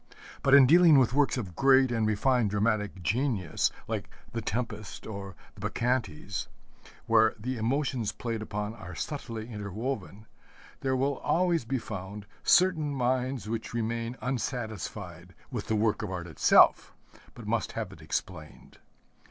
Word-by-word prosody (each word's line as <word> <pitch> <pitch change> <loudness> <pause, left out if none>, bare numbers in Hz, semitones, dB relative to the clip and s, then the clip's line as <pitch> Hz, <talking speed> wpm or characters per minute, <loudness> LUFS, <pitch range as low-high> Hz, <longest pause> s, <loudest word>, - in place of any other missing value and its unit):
But 135 0 +5
in 140 -2 +9
dealing 165 +1 +7
with 125 -3 +3
works 140 -1 +2
of 95 -8 -5
great 130 +3 +5
and 115 -2 +1
refined 115 +1 +2
dramatic 105 -2 0
genius 110 - 0 0.2
like - - -3 0.2
the 115 - -2
Tempest, 110 -3 -4
or 100 -3 -7 0.2
the - - -14
Bacchantes, 105 -7 -2 0.6
where 110 -1 +4
the 130 +4 -3
emotions 120 -1 0
played 115 -2 -4
upon 105 0 -4
are 90 -6 -9
subtly 115 - -5
interwoven, 105 0 -5 0.5
there 130 -1 0
will 135 +1 0
always 170 -6 +1
be 130 +3 -1
found 105 -2 -7 0.2
certain 170 -6 +3
minds 130 -2 -1
which 115 +1 -4
remain 115 +1 -2
unsatisfied 110 - -4 0.2
with - - -4
the 110 - +1
work 110 0 +1
of 105 - -4
art 90 -2 -4
itself, 80 - +4 0.4
but - - -10
must - - -1
have - - -4
it - - -14
explained. 80 -5 -6
115 Hz, 145 wpm, -29 LUFS, 105-130 Hz, 0.6 s, in